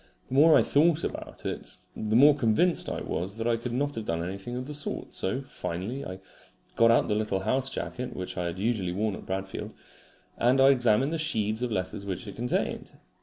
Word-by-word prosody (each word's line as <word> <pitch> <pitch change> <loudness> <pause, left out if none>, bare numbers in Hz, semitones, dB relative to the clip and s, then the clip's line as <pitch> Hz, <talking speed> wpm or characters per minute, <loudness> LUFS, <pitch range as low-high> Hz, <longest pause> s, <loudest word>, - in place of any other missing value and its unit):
The - - -6
more 155 +4 +7
I - - +5
thought 160 +2 +3
about - - -6
it - - -5 0.2
the 110 0 -1
more 145 +5 +8
convinced 145 +7 +2
I - - -3
was 95 +5 -3
that 115 - -3
I 120 - +3
could 115 +1 -5
not 145 +4 -1
have 110 -4 -4
done 85 -2 -1
anything 100 +7 -5
of 125 +1 -4
the 150 - -6
sort; 150 +1 -4
so 130 +8 -1
finally 115 +1 -5
I 95 +1 -7 0.6
got 115 0 +5
out 115 - +4
the - - +1
little 105 -2 0
house 130 +6 +1
jacket 125 -1 -5
which 90 -1 -5
I 90 - -2
had 85 +1 -3
usually 100 -4 -1
worn 105 +2 0
at - - -9
Bradfield, 95 0 -4 0.6
and 125 +3 +3
I 135 +1 +7
examined 130 +2 +3
the 165 - -1
sheaves 110 -8 0
of 125 -1 -1
letters 100 +1 -3
which 100 +3 -4
it 100 - -8
contained. 125 +1 -2
115 Hz, 215 wpm, -28 LUFS, 95-135 Hz, 0.6 s, more